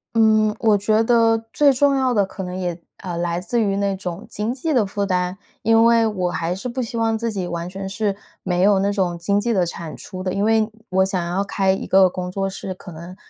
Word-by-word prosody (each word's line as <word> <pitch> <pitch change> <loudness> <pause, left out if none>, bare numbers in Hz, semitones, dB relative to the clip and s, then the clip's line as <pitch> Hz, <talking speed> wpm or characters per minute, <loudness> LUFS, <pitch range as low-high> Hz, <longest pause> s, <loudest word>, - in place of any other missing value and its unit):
嗯， 215 -1 +4
我 220 -3 +4
觉 215 +2 +2
得 230 -1 +4 0.2
最 290 -2 +5
重 275 +1 +3
要 260 -2 +1
的 205 -4 +3
可 195 - -8
能 180 0 -5
也， 180 -2 -3 0.2
呃， 180 -3 -5
来 170 0 -1
自 235 +6 -1
于 200 -2 +1
那 200 -1 0
种 180 +1 -6
经 210 +3 -2
济 305 +4 -2
的 230 -5 +3
负 200 +1 -2
担， 180 0 -1 0.2
因 225 +1 +4
为 230 -1 +4
我 185 -4 -1
还 170 +1 -2
是 220 +7 -5
不 255 +1 -3
希 235 0 -4
望 225 -1 +1
自 230 0 -2
己 190 -4 -3
完 170 0 -4
全 195 +1 -6
是 200 0 -1 0.3
没 180 -1 -1
有 200 -1 +5
那 200 +1 +1
种 185 -4 -1
经 200 +4 +1
济 230 +2 0
的 185 -3 +2
产 165 -2 -6
出 185 -2 -8
的， 185 - -2
因 200 - 0
为 220 0 +2 0.2
我 190 0 +3
想 185 -2 -2
要 190 +3 0
开 195 -1 +1
一 190 - -2
个 190 -1 +5
工 180 0 -5
作 195 0 -2
室， 190 0 -6
可 185 0 -12
能， 170 +3 -10
195 Hz, 260 characters per minute, -21 LUFS, 185-225 Hz, 0.3 s, 最